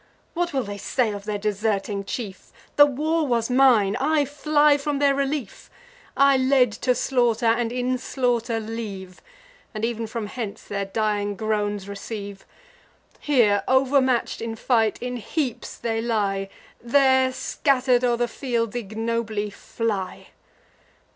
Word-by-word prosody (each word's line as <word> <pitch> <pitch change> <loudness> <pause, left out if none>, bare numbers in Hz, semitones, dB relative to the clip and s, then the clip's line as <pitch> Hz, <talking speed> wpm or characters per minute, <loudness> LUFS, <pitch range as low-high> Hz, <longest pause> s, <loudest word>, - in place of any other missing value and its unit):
What 345 0 -1
will 270 -2 0
they 205 -1 -7
say 235 +1 0
of 200 -1 -7
their 210 -1 -2
deserting 205 -1 -1
chief 200 -2 -6 0.2
The 290 0 +8
war 305 +3 0
was 235 -1 0
mine: 245 -6 +4
I 295 +1 +2
fly 295 +1 +3
from 285 0 -2
their 280 0 +3
relief; 275 -5 -3 0.5
I 275 -1 +5
led 260 -2 +3
to 250 +3 0
slaughter, 240 -2 +1
and 230 0 +2
in 250 +1 -1
slaughter 245 -3 -1
leave; 210 -5 -7 0.5
And 215 +1 -1
ev'n 230 -1 -3
from 225 0 -4
hence 210 -1 -6
their 200 -1 -3
dying 205 0 -1
groans 205 -2 -2
receive. 200 0 -7 0.7
Here, 220 -9 +3
overmatch'd 260 -1 +2
in 225 0 -4
fight, 225 -2 +1
in 250 0 -3
heaps 250 +2 -3
they 225 -1 -2
lie; 200 -4 -1 0.3
There, 260 +1 +3
scatter'd 255 -2 +1
o'er 240 -1 +2
the 240 0 0
fields, 235 -2 -2
ignobly 220 -1 -2
fly. 205 -3 -4
235 Hz, 135 wpm, -24 LUFS, 210-260 Hz, 0.7 s, The